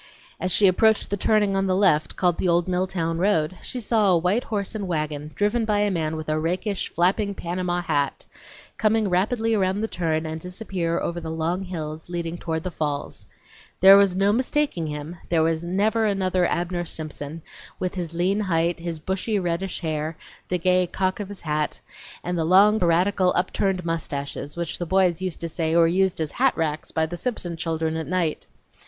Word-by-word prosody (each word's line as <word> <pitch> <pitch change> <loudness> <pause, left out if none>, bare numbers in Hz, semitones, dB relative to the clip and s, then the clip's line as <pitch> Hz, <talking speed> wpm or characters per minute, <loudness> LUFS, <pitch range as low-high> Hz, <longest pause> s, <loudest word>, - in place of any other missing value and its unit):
As 185 - -1
she 200 - +5
approached 215 +4 +3
the - - +2
turning 205 0 +2
on 195 0 +1
the 185 - +2
left 185 -6 +2
called 175 -2 +1
the - - +1
old 175 +1 +2
Milltown 180 -2 -1
road, 185 -3 +1
she 255 - -5
saw 220 -3 +2
a 180 - +5
white 180 +8 +1
horse 205 -2 -2
and 205 -3 -4
wagon, 150 -3 -2
driven 210 +3 +1
by 210 -2 +1
a 205 -1 +2
man 160 -3 -1
with 155 0 -6
a 155 0 0
rakish, 180 +5 -2
flapping, 200 +4 +1
Panama 175 0 -2
hat, 145 -4 -1 0.5
come 215 0 +3
rapidly 220 +5 +1
around 195 -1 +1
the 220 - 0
turn 160 -5 -1
and 160 0 -5
disappear 180 -2 -3
over 170 0 -3
the 160 - -5
long 165 +3 -1
hills 160 -4 -6
leading 170 -1 -3
down 165 -1 -3
to - - 0
the 185 - -4
falls. 145 -3 -3 0.5
There 195 +1 +9
was 200 -2 +5
no 200 +2 +3
mistaking 255 - 0
him; 150 +3 -6
there 165 -2 +3 0.2
never 205 +6 +1
was 210 - +3
another 185 -2 +1
Abner 175 0 -1
Simpson, 155 -1 -5 0.3
with 185 - -2
his 175 -4 -4
lean 185 +4 +1
height, 170 -3 0
his 170 -1 -4
bushy 190 +6 -2
reddish 180 +1 -2
hair, 155 -1 -3 0.3
the 180 - +1
gay 180 +1 +2
cock 185 +2 -1
of 205 - -4
his 205 - -8
hat, 150 -1 -2 0.4
and 180 +1 -2
the 165 - 0
long 200 +6 +5
piratical, 180 +2 +2
upturned 185 0 0
mustaches, 145 -2 -4
which 170 -1 -3
the 175 - -3
boys 185 -1 +2
used 185 -3 -3
to 170 - -2
say 165 0 -1
were 170 -1 +6
used 185 +2 +2
as 155 -2 -2
hat 265 +1 +2
racks 155 -1 -2
by 160 - +1
the 165 +2 -6
Simpson 175 -4 -3
children 160 0 -2
at 160 -1 -3
night.. 175 -3 -1
180 Hz, 195 wpm, -24 LUFS, 165-195 Hz, 0.5 s, There